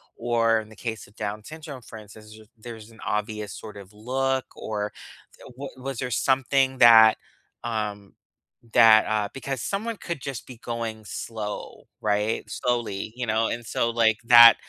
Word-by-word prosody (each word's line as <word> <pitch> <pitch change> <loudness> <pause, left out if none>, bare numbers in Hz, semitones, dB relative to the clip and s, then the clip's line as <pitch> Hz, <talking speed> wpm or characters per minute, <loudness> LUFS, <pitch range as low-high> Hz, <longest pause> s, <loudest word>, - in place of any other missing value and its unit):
or, 115 -2 +2
in 110 -1 -9
the 110 - -14
case 110 -3 -6
of 100 - -23
Down 105 0 -4
syndrome, 155 -1 -9
for 115 - -11
instance, 110 0 -13
ju 110 0 -14
there's 110 -1 -10
an 110 - -18
obvious 105 -1 -3
sort 105 -2 -9
of 100 0 -12
look 130 +4 -1
or 105 -1 -4 0.4
th - - -16
wa 140 +1 -5
was 135 0 -5
there 125 - -2
something 130 +2 +2
that 115 -2 +8 0.5
um, 105 -3 -4 0.6
that, 110 -1 +7
uh 110 -1 0
because 135 -2 -4
someone 215 - -3
could 170 -8 -5
just 135 -2 -6
be 125 - -10
going 115 -2 -5
slow, 105 0 -6
right? 105 +1 0
Slowly, 115 -4 -2
you 125 0 -3
know, 110 +1 +2
and, 120 0 -4
so, 115 - 0
like, 110 -2 +3
that, 120 -1 +10
115 Hz, 170 wpm, -25 LUFS, 110-125 Hz, 0.6 s, that